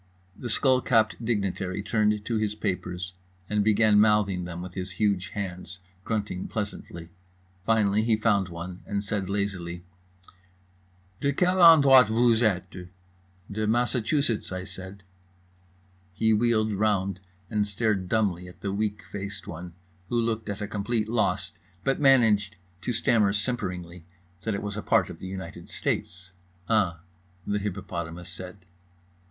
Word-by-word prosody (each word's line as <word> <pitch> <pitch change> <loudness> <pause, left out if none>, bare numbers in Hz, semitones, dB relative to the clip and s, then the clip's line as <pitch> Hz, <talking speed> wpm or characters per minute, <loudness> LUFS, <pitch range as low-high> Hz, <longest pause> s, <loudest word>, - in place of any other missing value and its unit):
The 125 - -6
skullcapped 115 -4 +2
dignitary 100 -4 -1
turned 105 -1 +1
to 115 - 0
his 105 -1 -1
papers 90 -3 -3 0.3
and 105 -1 +1
began 105 0 +4
mouthing 105 -4 +3
them 90 -1 -6
with 90 0 -7
his 95 0 -5
huge 100 -3 +1
hands, 95 -2 -5 0.3
grunting 105 -4 -2
pleasantly. 100 -5 -5 0.6
Finally 110 -2 +3
he 110 0 +3
found 105 -4 +2
one, 85 +3 -7
and 100 -1 -2
said 100 -2 -2
lazily: 95 -4 -3 1.4
"De 140 - +1
quelle 180 +5 +2
endroit 140 -7 +8
que 110 - -2
vooz 120 -1 +4
êtes?" 90 -4 -1 0.6
"De 110 +1 -1
Massachusetts," 120 +2 +1 0.2
said 95 +1 -10
I. - - -33 1.1
He 110 +2 +3
wheeled 110 -1 +2
round 100 -2 0 0.3
and 105 -1 +1
stared 100 -3 0
dumbly 95 -5 0
at 90 -1 -14
the 100 -1 -2
weak 105 0 -2
faced 100 -2 -6
one, 85 +1 -8 0.3
who 120 - +1
looked 115 -2 -1
at 100 +1 -3
a - - -3
complete 105 +1 -1
loss, 105 -6 0 0.3
but 135 - +1
managed 110 -7 +4 0.3
to 125 - -2
stammer 110 -3 +2
simperingly 90 -6 -3 0.4
that 110 +1 -1
it 100 - -4
was 100 -1 -4
a 105 - -3
part - - +2
of - - -11
the 95 - -7
United 95 0 -7
States. 90 +1 -3 0.4
"UH." 100 -7 +2 0.5
The 105 0 0
hippopotamus 90 -3 -5
said. 90 +1 -10
105 Hz, 140 wpm, -27 LUFS, 95-110 Hz, 1.4 s, endroit